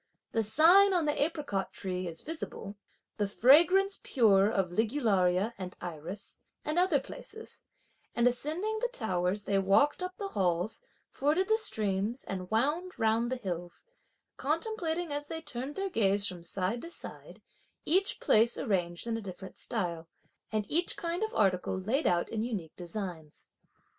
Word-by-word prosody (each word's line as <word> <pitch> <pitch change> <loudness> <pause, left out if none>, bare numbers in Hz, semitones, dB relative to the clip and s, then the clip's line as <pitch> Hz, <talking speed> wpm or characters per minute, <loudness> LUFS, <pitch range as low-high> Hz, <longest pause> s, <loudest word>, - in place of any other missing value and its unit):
"the 225 - +1
sign 350 - +6
on 340 -3 +2
the 295 -1 0
apricot 290 - -2
tree 185 -1 -4
is 165 -1 -4
visible," 300 -10 -6 0.4
"the 205 - 0
fragrance 345 - +5
pure 205 -6 +4
of 195 -5 0
the - - -8
ligularia 210 -5 +1
and 185 -1 -6
iris," 175 +4 -7 0.3
and 310 +3 +1
other 360 -6 +3
places; 445 +10 -9 0.5
and 235 - +2
ascending 315 - +1
the - - +2
towers 200 - -1
they 200 -1 +1
walked 200 - +3
up 365 0 -5
the 400 -1 -4
halls, 180 - 0 0.3
forded 315 +7 +1
the 440 - +4
streams 215 - -1
and 185 -2 -5
wound 300 +11 0
round 225 +2 +1
the - - +1
hills; 175 -7 -5 0.5
contemplating 330 +1 -2
as 290 0 -4
they 320 - -4
turned 270 -2 -4
their 390 0 -2
gaze 200 - +2
from 180 -3 -3
side 190 +6 -2
to 335 - -8
side, - - -8 0.5
each 380 +5 +2
place 230 +2 +4
arranged 175 -6 -1
in 230 -1 -1
a - - -5
different 190 -1 -9
style, 170 -7 -1 0.4
and 215 -1 -1
each 340 - 0
kind 340 +2 -2
of 440 0 -1
article 190 -2 +1
laid 225 +11 0
out 175 -1 +2
in 220 - -3
unique 210 -9 -4
designs. 175 -4 -7
225 Hz, 160 wpm, -30 LUFS, 190-320 Hz, 0.5 s, sign